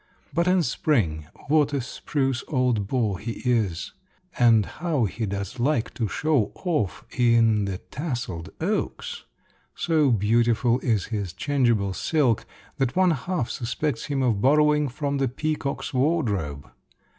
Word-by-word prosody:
But 170 +1 +1
in 180 -1 +4
spring, 85 - 0 0.2
what 145 -1 +3
a 140 - +1
spruce 135 0 -2
old 125 -8 +1
beau 110 -5 0
he 115 +4 -5
is! 110 -9 0 0.5
and 115 -4 +5
how 155 -8 -1
he 110 +3 -3
does 100 +4 -4
like 125 -2 0
to 115 - -1
show 145 +1 +1
off 155 - -2
in 115 -4 +4
the 95 -2 -3
tasseled 120 - -5
oaks! 215 - -3 0.5
So 155 -4 +2
beautiful 115 +2 +2
is 110 -7 0
his 100 -5 -2
changeable 115 -4 +1
silk 130 - +1 0.3
that 135 -1 0
one 185 -1 +4
half 160 -2 -2
suspects 120 +2 -2
him 140 -2 -1
of 115 -6 +1
borrowing 150 +2 +4
from 140 +2 -2
the 135 - +2
peacock's 145 +2 -3
wardrobe. 110 - 0
125 Hz, 135 wpm, -25 LUFS, 110-150 Hz, 0.5 s, and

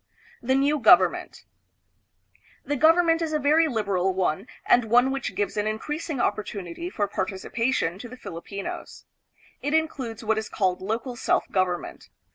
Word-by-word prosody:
The 260 +2 +1
New 285 +2 +2
Government. 230 - +4 1.2
The 290 - -1
government 330 +3 +4
is 320 -1 -2
a - - +3
very 305 +3 +3
lib 225 -7 -2
eral 190 -1 0
one, 185 +3 -1 0.2
and 240 -1 +4
one 245 +4 +4
which 270 -2 -3
gives 205 +1 -2
an 210 +1 0
increasing 295 +7 -3
opportunity 205 - -3
for 205 - -1
participation 195 0 -2
to 245 - -8
the 255 - -10
Filipinos. 200 -1 -7 0.6
It 290 +2 0
includes 260 -8 -2
what 220 0 +1
is 220 - -6
called 185 -3 0
local 225 +5 -3
self 230 - 0
government. 185 -2 -2
230 Hz, 150 wpm, -25 LUFS, 200-285 Hz, 1.2 s, Government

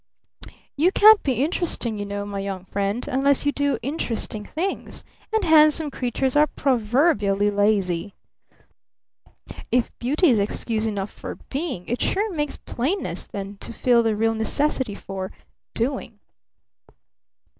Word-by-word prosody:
You 330 +6 +3
can't 430 +1 +7
be 270 - 0
interesting, 290 - -1
you 205 - -4
know, 200 0 -4
my 200 -1 -5
young 195 -2 -5
friend, 200 +5 -2
unless 280 0 +2
you 290 - +3
do 285 -1 0
interesting 235 -6 -3
things 350 - -4 0.3
and 440 -1 +1
handsome 310 -2 +5
creatures 260 +1 -1
are 300 +1 +5
proverbially 220 - +2
lazy. 200 -3 0 0.3
Humph! - - -19
If 250 -1 0
Beauty 295 +6 +3
is 225 - +3
excuse 215 +2 -1
enough 200 -2 -3
for - - -7 0.2
Being, 275 - -3
it 240 - -2
sure 405 -1 0
takes 295 -1 -2
Plainness 245 - -3
then 200 0 -6
to - - -7
feel 235 +1 +3
the 225 -2 +1
real 225 +1 +1
necessity 225 0 -1
for 190 -1 -6 0.4
Doing. 235 -2 -2
240 Hz, 135 wpm, -23 LUFS, 205-295 Hz, 0.4 s, can't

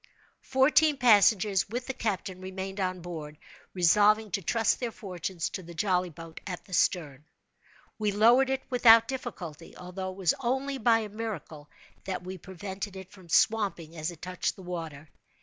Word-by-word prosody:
Fourteen 285 +3 +3
passengers, 210 -5 +4
with 245 +3 -4
the 265 - -4
captain, 190 -5 -3
remained 190 +1 -6
on 185 -1 -2
board, 155 -4 -7 0.4
resolving 210 +4 +4
to 195 - -1
trust 225 +5 +1
their 245 - -2
fortunes 180 -5 -4
to 190 - -5
the 170 -1 -11
jolly 180 0 +1
boat 165 0 -11
at 180 -2 -6
the 190 - -13
stern. 150 -6 0 0.8
We 210 -1 +1
lowered 235 +6 +5
it 265 0 -1
without 230 -2 +7
difficulty, 185 - -7
although 180 +1 -6
it 185 - -9
was 185 -4 +2
only 265 +2 -1
by 225 -1 +4
a 215 - -6
miracle 205 -9 -6 0.4
that 185 -1 -4
we 185 +1 -7
prevented 190 +2 -7
it 190 -1 -10
from 185 -4 -16
swamping 185 -5 +1
as 155 +1 -3
it 170 -3 -11
touched 180 0 -2
the 190 - -12
water. 165 -4 -6
190 Hz, 165 wpm, -28 LUFS, 175-225 Hz, 0.8 s, without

